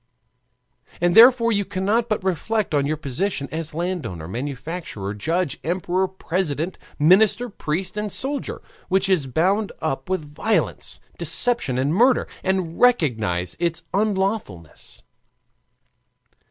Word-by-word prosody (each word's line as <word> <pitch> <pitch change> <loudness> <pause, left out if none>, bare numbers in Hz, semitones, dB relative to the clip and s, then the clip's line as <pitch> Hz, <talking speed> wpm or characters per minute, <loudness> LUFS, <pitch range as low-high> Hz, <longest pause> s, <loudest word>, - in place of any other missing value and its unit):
And 175 0 +2
therefore 230 +1 +7
you 205 -2 +1
cannot 200 +5 0
but 215 -3 -1
reflect 195 +2 -1
on 140 -1 +2
your 155 +1 -1
position 145 +2 -2
as 160 0 -5
landowner, 155 - -3
manufacturer, 125 - -5
judge, 160 - -1
emperor, 180 +3 0
president, 180 -3 -3 0.2
minister, 200 +10 +4
priest, 185 -1 -3
and 210 -1 -2
soldier, 275 +6 -3 0.3
which 190 +1 +2
is 180 -8 +2
bound 190 - +1
up 135 -1 -3
with 155 -6 -3
violence, 220 +9 -1 0.2
deception, 240 - +1
and 135 +4 +1
murder, 245 +7 +4 0.2
and 185 -3 -1
recognize 110 - +2
its 170 -1 -1
unlawfulness. 195 - -2
180 Hz, 115 wpm, -22 LUFS, 145-200 Hz, 0.3 s, therefore